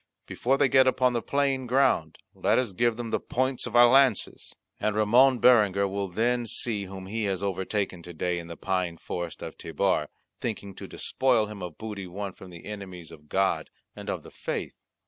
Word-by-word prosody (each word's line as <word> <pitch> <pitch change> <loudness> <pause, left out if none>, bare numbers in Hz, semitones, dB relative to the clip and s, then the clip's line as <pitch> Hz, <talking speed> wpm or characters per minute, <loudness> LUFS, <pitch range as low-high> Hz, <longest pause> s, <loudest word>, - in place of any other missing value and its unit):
Before 135 +3 0
they - - +4
get 130 0 +5
upon 130 -1 +3
the 120 - 0
plain 135 -2 0
ground 125 - +2 0.2
let - - +2
us 125 -6 0
give 115 +3 +1
them 120 -2 -5
the - - +1
points 130 0 -1
of 120 - -6
our 120 0 +9
lances; 130 -3 +2 0.2
and 105 -1 0
Ramon 125 +5 +5
Berenguer 105 -6 +5
will 100 0 -2
then 120 +5 0
see 105 -2 -1
whom 95 0 -8
he 110 +3 -2
has 95 -1 -2
overtaken 95 -1 -2
to 85 - -10
day 90 +2 -1
in 85 - -9
the 85 - -8
pine 90 -3 -1
forest 85 -1 -5
of - - -8
Tebar, 80 -1 0 0.3
thinking 100 -4 -4
to - - -9
despoil 125 -4 +1
him 105 -1 -9
of 90 -4 -7
booty 105 -4 -6
won 100 +2 -5
from 95 - -13
the 85 -1 -12
enemies 95 -5 -8
of 75 -1 -15
God 95 0 +1 0.3
and - - -7
of - - -3
the - - -13
faith." - - -4
105 Hz, 200 wpm, -27 LUFS, 95-120 Hz, 0.3 s, our